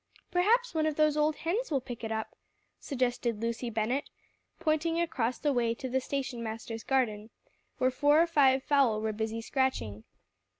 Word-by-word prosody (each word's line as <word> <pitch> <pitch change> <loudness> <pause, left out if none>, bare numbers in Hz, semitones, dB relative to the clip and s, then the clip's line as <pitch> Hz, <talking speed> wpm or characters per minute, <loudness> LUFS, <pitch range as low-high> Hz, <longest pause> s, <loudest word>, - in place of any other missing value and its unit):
"Perhaps 455 +7 +3
one 315 -1 +1
of 310 - -1
those 305 -1 +3
old 300 0 +2
hens 390 +12 -2
will 285 -4 +1
pick 245 -2 -8
it 225 - -3
up," 220 0 -3 0.4
suggested 245 -4 -1
Lucy 235 +2 -2
Bennett, 230 +5 -1 0.5
pointing 330 0 +1
across 255 -8 0
the 295 -2 0
way 235 -2 +1
to 260 - -5
the 260 +1 0
station 265 -3 -3
master's 225 0 -5
garden, 220 -5 0 0.5
where 255 0 +2
four 290 +4 +4
or 335 - +6
five 270 -5 +4
fowl 275 -7 +3
were 220 0 -1
busily 220 +1 -3
scratching. 225 - -1
260 Hz, 170 wpm, -30 LUFS, 230-305 Hz, 0.5 s, or